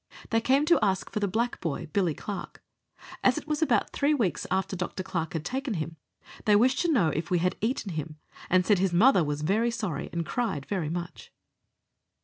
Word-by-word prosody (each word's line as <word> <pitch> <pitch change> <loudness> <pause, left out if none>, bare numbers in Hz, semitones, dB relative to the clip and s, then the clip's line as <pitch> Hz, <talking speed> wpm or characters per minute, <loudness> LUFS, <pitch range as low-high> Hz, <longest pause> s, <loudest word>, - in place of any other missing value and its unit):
They 225 0 +3
came 270 +5 +3
to 340 +1 +5
ask 190 -2 0
for - - -2
the 205 - +1
black 230 +5 -1
boy 165 -6 -3
Billy 180 -6 +1
Clarke. 205 -2 -7 0.6
As - - +4
it - - -6
was 300 0 -1
about 245 -9 +2
three 290 +1 +2
weeks 220 -10 -1
after 190 0 -1
Dr. 185 +1 -4
Clarke 165 -4 -3
had 160 -2 -3
taken 265 -3 -2
him, 160 0 -4 0.5
they 210 - +5
wished 255 +5 +4
to 345 - +2
know 195 - +3
if 160 +2 -3
we 180 - +2
had 180 +2 +1
eaten 220 -3 -1
him, 155 -1 -5 0.3
and 185 0 +4
said 205 -4 +4
his 190 -2 +1
mother 190 0 +5
was 150 0 -2
very 215 +8 +2
sorry 225 -8 -3
and 170 -1 -2
cried 195 - -2
very 180 -7 -2
much. 175 0 -6
195 Hz, 205 wpm, -28 LUFS, 170-235 Hz, 0.6 s, to